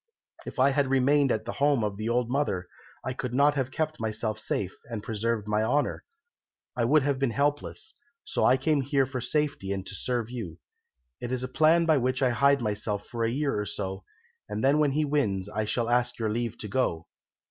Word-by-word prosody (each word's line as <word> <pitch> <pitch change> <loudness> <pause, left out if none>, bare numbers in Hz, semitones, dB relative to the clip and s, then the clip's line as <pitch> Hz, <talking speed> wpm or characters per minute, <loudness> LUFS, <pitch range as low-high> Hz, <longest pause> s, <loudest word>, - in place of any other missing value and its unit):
If - - -7
I 135 +2 +5
had 140 0 +2
remained 135 +1 +3
at 110 0 -1
the - - -3
home 140 -4 +2
of 105 -2 -1
the 110 +3 -3
old 120 0 +1
mother 100 -10 0 0.4
I 130 - -1
could 125 -1 -4
not 145 +2 +5
have 135 -3 -1
kept 155 +3 -2
myself 110 -1 -2
safe, 95 -3 -2
and 115 -3 -6
preserved 110 -1 -2
my 105 0 +1
honour; 140 +7 0 0.7
I 120 -2 +1
would 145 +3 +4
have 140 -1 0
been 135 -2 +2
helpless; 145 - -1 0.3
so - - -1
I 130 - +5
came 145 +2 +1
here 135 0 +2
for 130 -1 -4
safety 145 -9 -1
and 95 -1 -3
to - - -6
serve 120 +2 -2
you. 100 -10 -6 0.6
It 120 - -5
is 130 0 -1
a - - -2
plan 160 +5 +4
by 160 -2 +4
which 130 +1 0
to 130 -2 +2
hide 140 +2 +4
myself 105 -1 -2
for 115 -1 -2
a 115 - +2
year 135 -2 0
or 105 - -2
so, 95 -1 -4 0.5
and 105 +1 -3
then 140 +3 +4
when 145 -3 +3
he 155 +1 +1
wins 105 -11 0
I 110 +1 -2
shall 115 +2 -1
ask 120 0 +1
your 110 -2 -1
leave 115 0 -2
to 105 - -4
go." 95 -8 0
125 Hz, 215 wpm, -28 LUFS, 110-140 Hz, 0.7 s, I